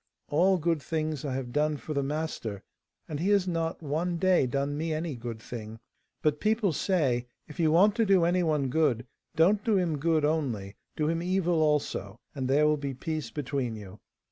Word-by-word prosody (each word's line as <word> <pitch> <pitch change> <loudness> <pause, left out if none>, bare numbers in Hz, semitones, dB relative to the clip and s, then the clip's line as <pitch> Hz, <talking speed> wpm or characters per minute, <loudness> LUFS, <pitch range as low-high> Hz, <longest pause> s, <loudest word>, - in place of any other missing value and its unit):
All 180 +6 +4
good 165 -2 0
things 155 -2 -2
I 135 -3 -2
have 125 -2 -4
done 150 0 +1
for 155 - -6
the 140 - +1
master, 140 -8 -3 0.4
and 150 -2 -4
he 185 +5 0
has 200 -2 +3
not 165 -1 -2
one 165 +4 -1
day 185 -6 +3
done 140 +3 -1
me 160 +1 -1
any 155 -2 -3
good 115 -1 -6
thing. 115 -1 -8 0.4
But 150 -1 +2
people 215 -4 +1
say, 135 -9 +1 0.2
"If 150 - -12
you 160 -2 +3
want 195 +6 +5
to 225 - +3
do 190 -3 +5
any 180 +1 +2
one 150 -5 +1
good, 130 -5 +1 0.3
don't 195 +6 +4
do 220 -4 +2
him 165 -5 0
good 160 0 +2
only, 120 -11 -1 0.2
do 150 - 0
him 165 +1 0
evil 175 -2 +1
also, 150 -8 0
and 130 -3 -3
there 145 +3 +4
will 150 0 +3
be 140 -2 -4
peace 155 +3 -4
between 135 -5 -3
you." 105 -1 -10
155 Hz, 195 wpm, -28 LUFS, 135-170 Hz, 0.4 s, want